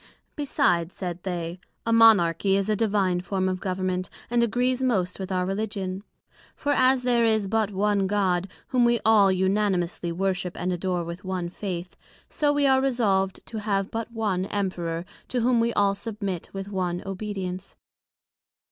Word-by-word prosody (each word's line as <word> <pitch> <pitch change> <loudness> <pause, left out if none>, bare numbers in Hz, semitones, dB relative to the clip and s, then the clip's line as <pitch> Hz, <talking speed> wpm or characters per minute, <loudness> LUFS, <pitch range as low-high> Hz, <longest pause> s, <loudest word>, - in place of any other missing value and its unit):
Besides, 270 - +1
said 180 -2 -5
they, 175 -1 -4 0.3
a 230 - +2
Monarchy 195 -5 +5
is 200 +1 -1
a 215 - +3
divine 200 -4 +1
form 190 0 -1
of 185 0 -1
Government, 185 -1 -2 0.2
and 240 0 +3
agrees 245 +2 +1
most 195 -9 0
with 190 0 -5
our 180 -1 +1
Religion: 195 -1 -3 0.5
For 290 - -1
as 260 -2 +4
there 240 -1 +3
is 220 -2 +2
but 215 +1 +1
one 200 0 +1
God, 190 -2 +1 0.2
whom 250 -2 +3
we 235 0 +3
all 210 -3 +6
unanimously 190 -2 0
worship 180 0 -2
and 180 +1 -1
adore 180 0 -1
with 170 +2 -7
one 185 -2 -3
Faith; 180 -1 -5 0.3
so 295 -1 +1
we 290 -1 +2
are 265 -1 +4
resolved 205 -8 +1
to 220 - -5
have 200 -2 -1
but 230 +1 -4
one 205 -5 -1
Emperor, 175 -4 -2 0.2
to 250 - -1
whom 240 0 +3
we 230 +1 +2
all 200 -1 +3
submit 200 -4 -5
with 195 0 -6
one 180 -3 -2
obedience. 195 -1 -5
195 Hz, 165 wpm, -25 LUFS, 185-225 Hz, 0.5 s, all